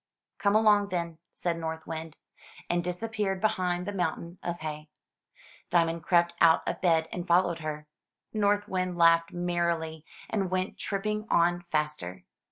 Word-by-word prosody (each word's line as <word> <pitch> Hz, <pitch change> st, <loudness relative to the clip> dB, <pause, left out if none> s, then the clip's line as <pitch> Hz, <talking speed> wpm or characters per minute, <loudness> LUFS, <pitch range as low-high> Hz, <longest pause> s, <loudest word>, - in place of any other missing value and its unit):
"Come 200 Hz, 0 st, +2 dB
along, 210 Hz, -2 st, +5 dB
then," 170 Hz, -3 st, -3 dB
said 170 Hz, -1 st, -2 dB
North 160 Hz, 0 st, -4 dB
Wind, 160 Hz, -1 st, -6 dB, 0.5 s
and 175 Hz, 0 st, +1 dB
disappeared 195 Hz, +2 st, -2 dB
behind 180 Hz, -4 st, 0 dB
the 205 Hz, -, -3 dB
mountain 175 Hz, -2 st, -3 dB
of 175 Hz, -1 st, -4 dB
hay. 150 Hz, 0 st, -5 dB, 0.8 s
Diamond 165 Hz, -1 st, +2 dB
crept 170 Hz, +1 st, +3 dB
out 165 Hz, -1 st, +5 dB
of -, -, -2 dB
bed 165 Hz, -3 st, +3 dB
and 175 Hz, 0 st, -5 dB
followed 170 Hz, -1 st, +3 dB
her. 150 Hz, -1 st, -5 dB, 0.5 s
North 205 Hz, -1 st, +2 dB
Wind 185 Hz, -1 st, -2 dB
laughed 165 Hz, 0 st, +5 dB
merrily, 170 Hz, -3 st, -1 dB, 0.2 s
and 195 Hz, -4 st, -1 dB
went 185 Hz, +1 st, -2 dB
tripping 210 Hz, +2 st, -2 dB
on 175 Hz, +1 st, +3 dB
faster. 150 Hz, -, -2 dB
175 Hz, 145 wpm, -29 LUFS, 165-185 Hz, 0.8 s, along